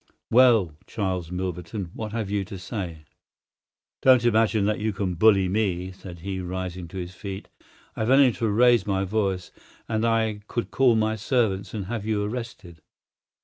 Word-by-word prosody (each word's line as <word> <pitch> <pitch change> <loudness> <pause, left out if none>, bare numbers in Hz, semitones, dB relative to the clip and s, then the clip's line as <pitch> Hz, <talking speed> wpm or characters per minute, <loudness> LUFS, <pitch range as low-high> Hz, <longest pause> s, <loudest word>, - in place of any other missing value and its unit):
Well, 115 -10 +5
Charles 95 -5 -2
Milverton, 90 +1 -4
what 110 -1 -5
have 110 -3 -3
you 100 -1 0
to 95 - -8
say?" 90 -5 -6 1.0
"Don't 130 -2 +5
imagine 110 -3 +3
that 105 +1 0
you 110 0 -1
can 95 -2 -2
bully 95 +1 +4
me," 95 -2 -1
said 90 -2 -11
he, 95 0 -4
rising 90 -1 -5
to 95 - -9
his 90 0 -5
feet. 95 0 -7 0.5
"I - - -8
have 110 +1 0
only 135 -1 +6
to 115 -1 -2
raise 120 -1 +4
my 95 -1 +1
voice, 95 -2 -1 0.4
and 110 -1 -1
I 110 -2 +1
could 120 - -3
call 125 -3 +4
my 110 0 +1
servants 110 -3 0
and 100 -3 -3
have 110 +1 -4
you 105 -1 0
arrested. 105 -7 -6
100 Hz, 170 wpm, -25 LUFS, 95-110 Hz, 1.0 s, only